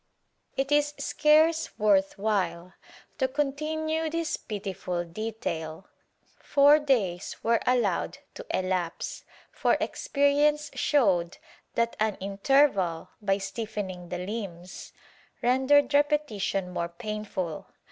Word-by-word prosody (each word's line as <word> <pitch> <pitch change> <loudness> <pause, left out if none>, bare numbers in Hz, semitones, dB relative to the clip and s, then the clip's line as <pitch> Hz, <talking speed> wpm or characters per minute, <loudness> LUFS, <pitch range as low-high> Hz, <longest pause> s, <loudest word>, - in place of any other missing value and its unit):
It 270 +1 -1
is 295 0 +2
scarce 315 +2 +3
worth 195 -2 +3
while 185 -4 -1 0.5
to 260 - +3
continue 310 +3 -1
this 330 0 -1
pitiful 190 -4 -4
detail. 170 -3 -5 0.5
Four 290 +2 +5
days 210 - 0
were 230 0 +3
allowed 245 -1 +1 0.2
to - - -8
elapse, 185 -2 -2 0.3
for - - +2
experience 290 +1 +1
showed 190 - +2 0.4
that 235 0 +1
an 215 -2 +1
inter 200 +9 +4
val, 180 - -3
by 195 -2 +1
stiffening 195 -3 -5
the 180 - -3
limbs, 185 -4 -7 0.5
rendered 265 +3 +4
repetition 285 -11 +1
more 170 -1 -2
painful. 205 -4 -5
215 Hz, 105 wpm, -27 LUFS, 185-285 Hz, 0.5 s, Four